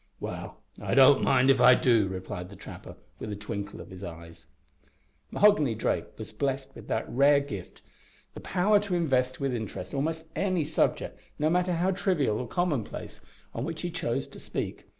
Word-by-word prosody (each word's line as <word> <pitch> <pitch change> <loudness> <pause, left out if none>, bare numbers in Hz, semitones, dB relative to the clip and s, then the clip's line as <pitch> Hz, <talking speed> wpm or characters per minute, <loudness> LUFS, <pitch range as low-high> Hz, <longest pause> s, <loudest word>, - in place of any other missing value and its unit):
"Well, - - -7 0.2
I - - -1
don't 135 0 +7
mind 130 0 +4
if 130 -2 +2
I 125 +1 +8
do," 115 -6 +3
replied 95 -1 -6
the 100 - -11
trapper, - - -10 0.2
with 105 - -5
a - - -3
twinkle 100 -1 -6
of - - -10
his 95 +1 -9
eyes. 85 -4 -10 0.8
Mahoghany 155 - +4
Drake - - -2
was - - -7
blessed 135 -1 -2
with - - -12
that 110 - -1
rare 140 +3 +4
gift, 105 -10 -8 0.5
the - - -8
power 200 +3 +2
to 200 -3 -2
invest 130 -6 +1
with 135 -2 -1
interest 105 -5 -5
almost 160 +3 -2
any 185 -4 +1
subject, 150 - 0 0.2
no 155 +2 +1
matter 180 +1 +2
how 175 +3 +1
trivial 180 - +1
or 125 - -4
commonplace, 150 - -2 0.3
on 115 - -3
which 160 +3 -5
he 175 - -2
chose 165 -9 -2
to - - -11
speak. - - -5
135 Hz, 180 wpm, -28 LUFS, 110-165 Hz, 0.8 s, I